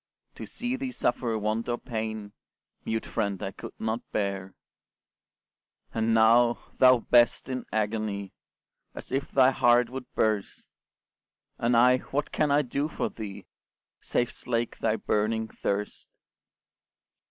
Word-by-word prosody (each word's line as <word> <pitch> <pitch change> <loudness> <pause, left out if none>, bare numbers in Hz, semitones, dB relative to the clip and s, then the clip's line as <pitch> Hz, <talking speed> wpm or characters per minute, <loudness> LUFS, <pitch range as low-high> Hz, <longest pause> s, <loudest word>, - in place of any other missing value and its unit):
To - - -8
see 245 +1 -3
thee 260 -1 -4
suffer 115 - 0
want 110 +3 -1
or 120 - 0
pain, 110 -3 -5 0.5
Mute 110 0 -2
friend 100 -2 -2
I 95 - -3
could - - -10
not 110 +1 -2
bear; 100 -2 -2 1.4
And 110 0 +1
now, 115 +2 +5 0.2
thou 130 -2 +7
best 120 +2 +3
in 130 -2 -4
agony, 105 -2 -2 0.6
As - - -9
if 135 +1 -1
thy 130 -1 +5
heart 120 -1 +3
would 130 -1 -7
burst, 105 -2 -1 0.9
And 120 0 +2
I, 125 +2 +6
what 145 +3 -3
can 155 - +1
I 145 +1 +4
do 140 +3 -1
for 155 - -3
thee, 105 -3 -8 0.6
Save 120 0 0
slake 120 -1 -3
thy 110 - +1
burning 110 +1 0
thirst? 100 +1 -3
115 Hz, 130 wpm, -27 LUFS, 110-125 Hz, 1.4 s, thou